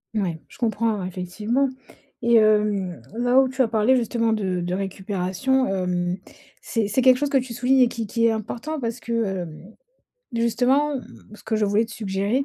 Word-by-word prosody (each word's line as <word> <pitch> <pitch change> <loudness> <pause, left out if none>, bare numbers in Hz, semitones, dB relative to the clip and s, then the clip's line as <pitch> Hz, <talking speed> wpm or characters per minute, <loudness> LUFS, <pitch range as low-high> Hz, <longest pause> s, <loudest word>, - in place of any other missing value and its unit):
Ouais, 180 -6 -1
je - - -17
comprends, 225 -2 0
ouais, 185 - -3
effectivement 210 +9 -1 0.6
et 235 0 +5
hem, 210 - +2 0.2
là, 245 +2 +4
où 265 - +1
tu 260 +1 -1
as - - +1
parlé 220 +3 +3
justement 230 -1 0
de 190 -4 -1
de 175 +1 -2
récupération, 195 +6 -1
hem, 180 -2 -1 0.5
c'est 225 -3 -1
c'est 210 +6 +1
quelque 255 0 +6
chose 290 +2 0
que 275 - +3
tu 255 -1 -6
soulignes 250 +3 +2
et 245 - +6
qui 230 -2 -4
qui 230 +2 +2
est - - +3
important, 235 +8 -4
parce 235 -1 -3
que, 235 - -7 0.3
hem, 175 +5 -10 0.6
justement, 245 +6 +2 0.4
ce - - -15
que - - -1
je 215 -1 +2
voulais 205 +3 +2
te 225 - -10
suggérer, 205 +5 -1
225 Hz, 190 wpm, -23 LUFS, 195-245 Hz, 0.6 s, quelque